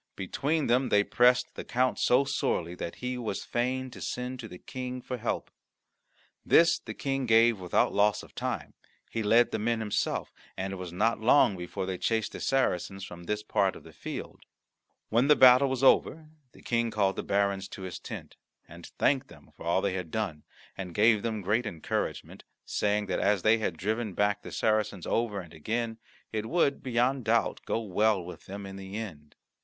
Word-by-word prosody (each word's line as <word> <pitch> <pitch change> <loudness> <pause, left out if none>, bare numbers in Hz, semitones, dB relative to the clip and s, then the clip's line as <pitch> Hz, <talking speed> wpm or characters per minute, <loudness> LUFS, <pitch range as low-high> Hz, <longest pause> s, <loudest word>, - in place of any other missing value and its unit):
Between 145 - -1
them 125 +2 +2
they 105 0 +4
pressed 125 +3 +3
the - - -6
count 125 +1 0
so 125 +3 +4
sorely 120 -11 -1
that 85 -1 -6
he 125 0 -2
was 110 -5 -4
fain 130 +2 -1
to - - -11
send 125 +1 -4
to 115 - -6
the 90 - -10
King 125 +4 -6
for 125 0 -5
help. 120 0 -3 0.9
This 170 0 +5
the - - -8
King 135 -2 -2
gave 115 -1 +5
without 90 -1 +1
loss 105 +1 +2
of - - -15
time; 120 - -4 0.4
he 115 - -2
led 115 +3 +4
the - - -1
men 115 +2 0
himself, 105 -2 -2 0.2
and 95 +1 -3
it - - -5
was 90 -2 -6
not 110 +6 +1
long 110 -2 +5
before 90 +1 -5
they 95 -1 -4
chased 110 -2 0
the - - -7
Saracens 95 -7 0
from 85 -1 -10
this 105 +3 -2
part 100 -3 +1
of - - -12
the 80 - -14
field. - - -7 0.7
When 120 +5 +3
the 150 - +7
battle 130 +1 +7
was 130 0 -2
over 155 +3 +3 0.2
the - - -18
King 115 -1 +1
called 100 -3 +1
the - - -2
barons 100 -1 0
to 95 - -9
his 95 -1 -6
tent, - - -9 0.3
and 85 +1 -11
thanked 135 -2 +2
them - - -17
for - - -9
all 85 +2 +2
that 100 - +2
they 95 - -4
had 90 -3 -4
done, 90 -7 -3 0.3
and 90 -3 -7
gave 110 0 +5
them 110 -2 -2
great 105 +5 0
encouragement, 85 -7 -4 0.2
saying 105 0 0
that 95 - -1
as 100 -3 +2
they 110 +1 +4
had 90 -6 -2
driven 110 +1 -2
back 105 0 +1
the - - -9
Saracens 110 -4 0
over 115 -3 0
and 85 -3 -14
again, 115 +8 -3 0.3
it 110 0 -3
would, 150 -3 +1
beyond 125 0 0
doubt, 115 +1 +1
go - - 0
well 105 -2 +1
with 90 - -10
them 100 +1 -7
in 95 0 -8
the 95 +1 -7
end. 80 -10 -8
110 Hz, 200 wpm, -29 LUFS, 95-125 Hz, 0.9 s, the